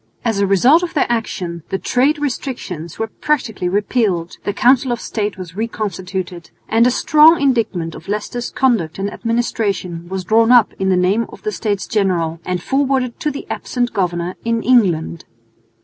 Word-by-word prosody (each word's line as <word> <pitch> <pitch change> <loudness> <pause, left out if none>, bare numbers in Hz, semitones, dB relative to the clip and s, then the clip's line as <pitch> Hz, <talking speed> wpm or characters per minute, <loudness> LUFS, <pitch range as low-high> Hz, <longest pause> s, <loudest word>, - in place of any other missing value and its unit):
As 225 -4 +1
a 200 - +2
result 245 - +5
of 355 -2 -4
their 295 - +3
action 185 -7 -3
the 190 - -1
trade 265 +9 +1
restrictions 245 - -4
were 225 - -1
practically 220 -6 -2
repealed, 200 -3 0
the - - 0
Council 250 +4 +3
of 240 - -1
State 210 -3 -3
was 180 -2 -9
reconstituted, 190 -5 -4 0.2
and 230 +2 +4
a - - +5
strong 310 +6 +5
indictment 225 -12 0
of 160 - -11
Leicester's 210 +4 -3
conduct 225 -12 +1
and 200 +1 -3
administration 205 -7 -2
was 190 0 -3
drawn 225 +5 +3
up 240 -4 +5
in 190 0 +1
the 185 - +3
name 195 +6 +1
of - - -13
the 215 - -1
States 205 -1 -2
General 175 -6 0
and 180 -1 -2
forwarded 265 -3 0
to 300 - 0
the 280 - -6
absent 245 -1 -2
governor 175 -3 -1
in 230 0 -1
England. 175 -10 +2
210 Hz, 170 wpm, -18 LUFS, 180-245 Hz, 0.2 s, result